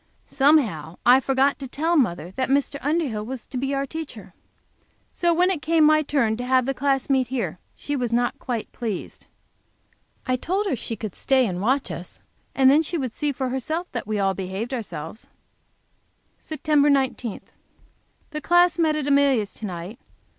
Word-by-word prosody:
Somehow 230 - +2
I 250 +2 +7
forgot 270 +2 +1
to 270 - -6
tell 320 +7 0
mother 175 - +1
that 260 +6 -2
Mr. 280 +1 +1
Underhill 285 -8 -1
was 250 +1 -7
to - - -11
be 270 +2 -1
our 275 0 -1
teacher. 270 - -8 0.8
So 345 -1 +1
when 360 +3 +3
it 335 -6 -2
came 325 0 +3
my 310 0 +5
turn 255 -7 0
to 245 - -4
have 255 0 +2
the 270 - 0
class 270 0 0
meet 265 -2 +2
here, 225 -9 -3 0.2
she 290 - -4
was 245 -4 -2
not 240 +1 0
quite 240 -4 -4
pleased. 220 -6 -6 1.0
I 255 0 +1
told 380 +10 -1
her 375 - 0
she 225 0 -4
could 215 -4 -6
stay 265 -2 +2
and 180 -4 -3
watch 260 +6 +1
us, - - -8 0.4
and 265 -1 +5
then 295 +3 +5
she 335 +2 -3
would 260 -6 -3
see 295 -1 -1
for 260 -1 -3
herself 310 +7 -3
that 240 - -5
we 215 -1 -1
all 195 -1 +1
behaved 195 +6 -4
ourselves. 215 -5 -6 1.1
Sept. 310 -1 -2 0.2
19. 260 -5 0 0.9
The 305 -1 -4
class 350 0 +4
met 315 -2 +3
at 305 -2 -2
Amelia's 280 -7 +2
to 215 - -6
night. 180 +6 -7
265 Hz, 180 wpm, -24 LUFS, 225-295 Hz, 1.1 s, I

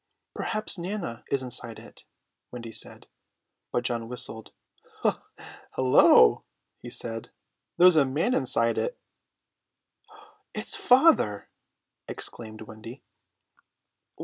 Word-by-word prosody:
"Perhaps 215 -3 0
Nana 170 - -5
is 135 -1 0
inside 120 -2 -6
it," - - -15 0.4
Wendy 115 -2 -8
said. - - -5 0.7
But 120 - -1
John 115 -2 -1
whistled. 110 -3 -3 1.2
"Hullo," 130 -1 +6 0.4
he 120 - -9
said, 115 -1 -5 0.5
"there's 180 -2 +7
a 150 - +6
man 145 - 0
inside 115 - +1
it." - - -3 1.6
"It's - - -1
father!" 260 - +3 0.6
exclaimed 110 -2 -5
Wendy. 110 +3 -11
125 Hz, 95 wpm, -27 LUFS, 115-180 Hz, 1.6 s, there's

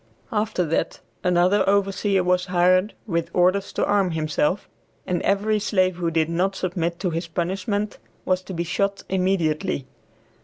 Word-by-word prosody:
After 215 -4 0
that 160 - -1 0.2
another 180 +3 +3
overseer 195 -1 +2
was 180 +1 +1
hired, 185 +3 +3
with 170 -5 -1
orders 185 +2 +2
to - - +1
arm 200 -2 +2
himself, 155 +3 0 0.4
and 180 -1 -1
every 210 +2 +1
slave 185 -3 +1
who 170 -2 0
did 160 -1 +1
not 180 +4 0
submit 170 -2 -2
to 180 -3 0
his 165 +1 -3
punishment 190 +5 -2 0.3
was 185 0 +1
to 190 - -6
be 170 - -1
shot 200 +3 -1
immediately. 185 -5 0
185 Hz, 150 wpm, -23 LUFS, 170-195 Hz, 0.4 s, another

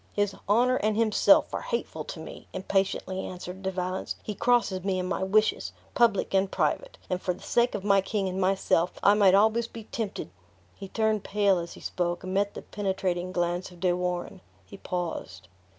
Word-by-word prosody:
"His 205 -1 +1 0.2
honor 250 +4 +4
and 215 0 0
himself 225 -2 +4
are - - -2
hateful - - -3
to - - -7
me!" - - -10
impatiently 190 0 -1
answered 180 +1 -7
De 190 - -1
Valence; 185 0 -3
"he 210 - -4
crosses 210 -4 +2
me 190 -1 0
in 180 - -1
my 185 - -2
wishes, 215 +3 +2 0.2
public 230 -6 +2
and 190 0 +3
private; - - -1
and 180 0 -2
for 180 - -1
the - - -15
sake 240 +1 +2
of 200 - -4
my 200 -1 +4
king 195 0 -1
and 185 +1 -2
myself, 185 -2 +2
I 200 - +7
might 200 -2 +5
almost 220 +3 +3
be 230 - -7
tempted 210 - -5 0.2
" 90 -1 -33
He 195 - -6
turned 220 0 0
pale 200 -2 +2
as 170 0 -6
he - - -13
spoke, 175 -1 -2
and 185 0 -4
met 200 +1 +1
the - - -7
penetrating 185 -3 -2
glance 175 0 -1
of 180 -1 -15
De 180 0 +2
Warenne. 180 +1 -3 0.2
He 200 - -11
paused. 165 - -5
190 Hz, 200 wpm, -27 LUFS, 180-210 Hz, 0.2 s, I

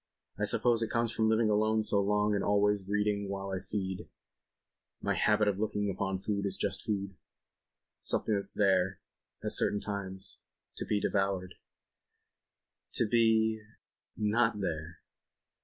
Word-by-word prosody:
I - - +1
suppose 120 -2 +3
it 115 - -1
comes 115 -1 0
of 110 - +4
living 110 0 +3
alone 110 +1 +2
so 100 -1 +2
long 105 +1 +1
and 100 - 0
always 100 -1 +2
reading 105 0 0
while 100 0 -4
I 95 - -2
feed... 95 -2 -4 0.9
my - - 0
habit 105 0 +2
of 100 -1 0
looking 105 -1 -1
upon 95 0 -2
food 100 +1 -2
as 95 0 +1
just - - -2
food... 100 -2 -2 0.9
something 110 - -1
that's 100 -1 0
there, 95 -2 +2 0.4
at - - 0
certain 105 - +2
times... 95 -2 -6 0.4
to - - -3
be 105 - +1
devoured... 95 -3 -1 1.4
to 115 - +2
be... 110 -1 +3 0.6
not 110 +1 +1
there." 80 -3 -4
105 Hz, 140 wpm, -31 LUFS, 95-110 Hz, 1.4 s, of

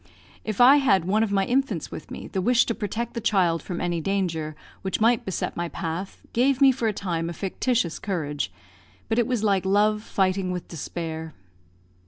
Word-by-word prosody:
If 215 -2 -4
I 260 +4 +8
had 195 - +3
one 205 +4 +2
of 225 -2 +1
my 195 -1 +2
infants 245 - 0
with - - -8
me, - - -7
the 190 - -3
wish 245 +5 +4
to 230 - -1
protect 230 +1 -3
the 235 - -4
child 185 -6 +2
from 175 -2 -5
any 175 -1 -1
danger 165 -5 -1 0.3
which 190 -1 -2
might 230 +1 +3
beset 190 - -3
my 175 0 -2
path 170 +3 -5
gave 255 +2 +3
me 275 -1 +7
for 240 -3 -1
a - - +2
time 170 -5 -2
a - - -4
fictitious 195 0 -1
courage; 150 - -3 0.6
but 225 +1 +2
it 240 - +2
was 245 -4 -1
like 195 -3 +2
love 210 +2 +2
fighting 190 -3 0
with 180 -2 -4
despair. 160 0 -5
195 Hz, 195 wpm, -25 LUFS, 170-225 Hz, 0.6 s, I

